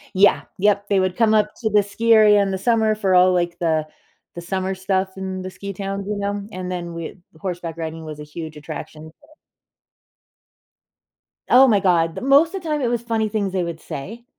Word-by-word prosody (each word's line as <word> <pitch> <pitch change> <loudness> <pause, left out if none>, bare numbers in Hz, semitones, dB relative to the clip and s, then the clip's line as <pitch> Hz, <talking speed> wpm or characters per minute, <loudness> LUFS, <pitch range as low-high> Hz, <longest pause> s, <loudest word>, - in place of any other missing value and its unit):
Yeah. 200 +2 +4 0.2
Yep, 200 +1 +2
they 200 -2 +3
would 185 -1 -1
come 225 -2 +3
up 215 -1 +3
to 220 - 0
the 210 0 +4
ski 225 +3 0
area 210 -2 +6
in 195 - -1
the 190 - -2
summer 220 +1 +2
for 195 -3 0
all, 180 0 +6
like, 175 -1 -1
the 160 -2 0 0.5
the 175 - -6
summer 190 +2 -2
stuff 190 0 -1
in 190 -1 -4
the 185 - -6
ski 200 +1 -7
towns, 195 +1 -4
you 210 - -2
know? 200 0 -3
And 185 0 -5
then 175 -1 -5
we 165 -1 -6 0.2
the - - -18
horseback 175 -2 -5
riding 160 -1 -5
was 155 -1 -8
a - - -7
huge 155 +1 -8
attraction, 155 +1 -9
so 295 - -23 2.2
Oh 260 +2 +8
my 215 -6 +3
God. 170 -4 +2
The - - -6
most 285 +6 +4
of 385 - -4
the 330 - -7
time, 300 -1 0
it 250 - 0
was 235 -1 -1
funny 225 -2 -1
things 205 -3 -2
they 185 -2 0
would 170 -1 -6
say. 220 +15 -8
190 Hz, 215 wpm, -21 LUFS, 175-215 Hz, 2.2 s, Oh